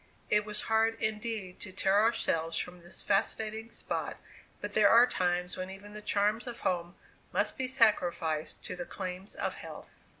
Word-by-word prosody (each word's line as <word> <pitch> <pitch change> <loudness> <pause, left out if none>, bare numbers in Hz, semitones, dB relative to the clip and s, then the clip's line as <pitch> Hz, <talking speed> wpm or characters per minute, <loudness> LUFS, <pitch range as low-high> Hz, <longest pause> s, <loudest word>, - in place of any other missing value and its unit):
It 210 0 +4
was 210 -1 +2
hard 225 0 +2
indeed 215 -3 -2
to 190 - -3
tear 190 +2 +3
ourselves 165 -7 +1
from 180 0 -4
this 175 - -4
fascinating 220 +2 0
spot, - - -4 0.4
but - - -5
there - - +6
are 235 +2 +8
times 180 -4 0
when 185 0 -4
even 200 +2 -10
the 210 - -7
charms 210 +3 +1
of 235 -1 -6
home 175 -1 -1 0.4
must 205 +3 +1
be 260 - -1
sacrificed 175 - +2
to 185 - -4
the 175 -1 -5
claims 185 +1 -5
of - - -1
health. - - -9
205 Hz, 170 wpm, -31 LUFS, 180-220 Hz, 0.4 s, are